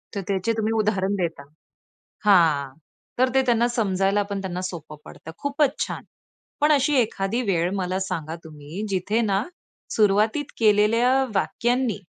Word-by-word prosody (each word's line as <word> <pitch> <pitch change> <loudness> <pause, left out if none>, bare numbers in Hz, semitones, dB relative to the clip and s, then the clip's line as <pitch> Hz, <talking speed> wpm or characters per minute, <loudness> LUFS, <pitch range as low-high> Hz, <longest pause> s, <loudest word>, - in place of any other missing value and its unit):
तर 200 - -2
त्याचे 200 +3 0
तुम्ही 220 0 0
उदाहरण 205 -2 +1
देता. 170 -6 -3 0.8
हां, 155 -9 +4 0.5
तर 255 0 +4
ते 265 - +6
त्यांना 240 -1 +3
समजायला 200 -3 +1
पण 200 -1 -3
त्यांना 180 -2 -4
सोपं 160 -4 -6
पडतं, 160 - -11
खूपच 285 0 0
छान. - - -6 0.6
पण 300 +1 +4
अशी 290 0 +3
एखादी 215 0 -1
वेळ 170 -1 +1
मला 185 -1 -1
सांगा 165 -4 -4
तुम्ही 155 +5 -8
जिथे 200 +4 0
ना, 200 -1 +1 0.5
सुरुवातीत 215 +6 +2
केलेल्या 220 +3 +4 0.3
वाक्यांनी 240 +4 0
200 Hz, 140 wpm, -24 LUFS, 185-230 Hz, 0.8 s, ते